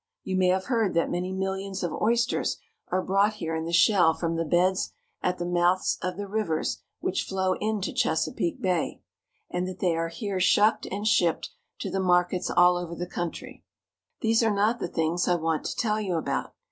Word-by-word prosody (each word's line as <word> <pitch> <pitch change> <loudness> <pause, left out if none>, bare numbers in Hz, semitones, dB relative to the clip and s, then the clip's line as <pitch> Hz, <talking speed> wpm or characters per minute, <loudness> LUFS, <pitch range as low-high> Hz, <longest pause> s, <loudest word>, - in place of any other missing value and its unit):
You 190 - -2
may 185 -1 +3
have 185 +1 +1
heard 225 -8 0
that 170 - +1
many 180 +1 -2
millions 190 0 -3
of 175 - -2
oysters 235 +3 +1 0.3
are 185 - 0
brought 200 +3 +2
here 165 -5 -3
in 160 0 -3
the 165 - -4
shell 170 -2 +5
from 165 -1 -2
the 165 - 0
beds 180 +4 +2 0.3
at 180 0 0
the 175 - -3
mouths 175 +1 +2
of 180 0 -3
the 205 - -4
rivers 195 -6 -1 0.2
which 190 - 0
flow 190 -1 0
into 215 -2 -1
Chesapeake 330 -6 0
Bay, 185 -6 -1 0.5
and 180 +1 -1
that 185 - -6
they 175 -3 +1
are 165 0 -1
here 200 +1 -3
shucked 205 +4 +3
and 205 +3 -3
shipped 175 - +2 0.3
to - - -3
the 195 - -1
mar 180 -1 +3
kets 185 0 -3
all 180 0 +6
over 170 -1 -5
the 175 - -4
country. 175 -1 -6 0.6
These 225 +1 +3
are 225 - +3
not 210 +3 +1
the - - -2
things 165 +1 0
I 180 - +3
want 160 -2 -1
to - - -3
tell 215 -2 0
you 190 -4 -1
about. 160 - -2
185 Hz, 200 wpm, -27 LUFS, 175-205 Hz, 0.6 s, all